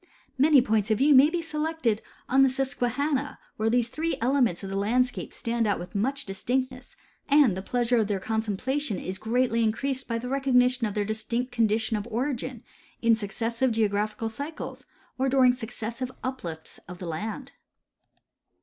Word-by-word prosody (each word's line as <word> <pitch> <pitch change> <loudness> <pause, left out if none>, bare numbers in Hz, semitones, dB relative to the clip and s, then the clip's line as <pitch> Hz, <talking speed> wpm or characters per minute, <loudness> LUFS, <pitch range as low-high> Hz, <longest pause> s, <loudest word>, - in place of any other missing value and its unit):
Many 280 -1 +5
points 215 -2 +1
of 215 - +3
view 290 +5 +5
may 275 +3 +8
be 340 0 -2
selected 305 -8 -1 0.3
on 265 +2 +4
the 270 - +6
Susquehanna, 270 +2 -1 0.2
where 220 +1 +1
these 240 0 +2
tliree 320 +7 -2
elements 245 -6 +1
of 195 - -5
the - - -3
landscape 245 +5 0
stand 230 -2 -1
out 205 - +1
with 175 +1 -8
much 270 +7 -1
distinctness, 250 +5 -3 0.3
and 280 -9 +5
the 190 - -4
pleasure. 245 +3 +1
of 220 -3 +2
their 205 -2 -1
contemplation 220 +4 -1
is 190 +1 -5
greatly 230 +1 +1
increased 260 +5 -1
by 230 - -1
the 240 +2 -5
recognition 255 -2 +2
of 205 - -6
their 205 -1 0
distinct 230 +4 -2
conditions 220 -2 +1
of 230 - -12
origin 255 0 -3 0.4
in 230 -1 +5
succes 225 +2 -4
sive 260 0 +2
geographical 215 0 0
cycles 285 +8 -6 0.3
or 265 +1 +2
during 255 -2 +5
successive 235 +1 -5
uplifts 175 -12 -6
of 180 +1 -8
the 180 - -7
land. 220 - -5
240 Hz, 165 wpm, -27 LUFS, 215-265 Hz, 0.4 s, may